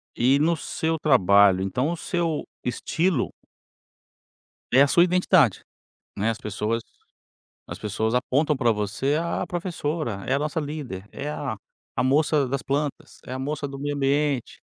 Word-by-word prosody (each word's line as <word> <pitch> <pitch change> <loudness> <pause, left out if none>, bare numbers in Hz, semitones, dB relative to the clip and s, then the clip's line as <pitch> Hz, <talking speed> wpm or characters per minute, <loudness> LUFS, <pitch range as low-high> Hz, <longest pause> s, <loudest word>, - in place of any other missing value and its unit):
e 130 +4 +4
no 165 +3 +3
seu 160 +2 -2
trabalho, 100 - +5
então 125 +10 0
o 170 - -1
seu 165 -2 -1 0.2
estilo 160 +4 0 1.4
é 130 +2 +6
a 140 - +6
sua 170 +5 +5
identidade, 180 - +3 0.5
né, 110 +3 +1
as 110 - -3
pessoas 105 +2 -2 0.8
as - - -7
pessoas 110 +2 -1
apontam 140 +4 +1
pra 120 -3 +3
você: 105 +7 -1
"Ah, 170 +1 -1
a - - -3
professora, 155 - -3
é 135 - +1
a - - +2
nossa 155 +2 -2
líder, 140 -10 -6
é 145 +1 -4
a 135 -7 -4 0.4
a - - +2
moça 145 +1 +2
das 135 0 -2
plantas, 145 +1 -3
é 130 - -6
a 130 - -3
moça 145 +1 -3
do 135 0 -8
meio 145 +1 -2
ambiente". 140 -2 0
140 Hz, 160 wpm, -25 LUFS, 115-155 Hz, 1.4 s, é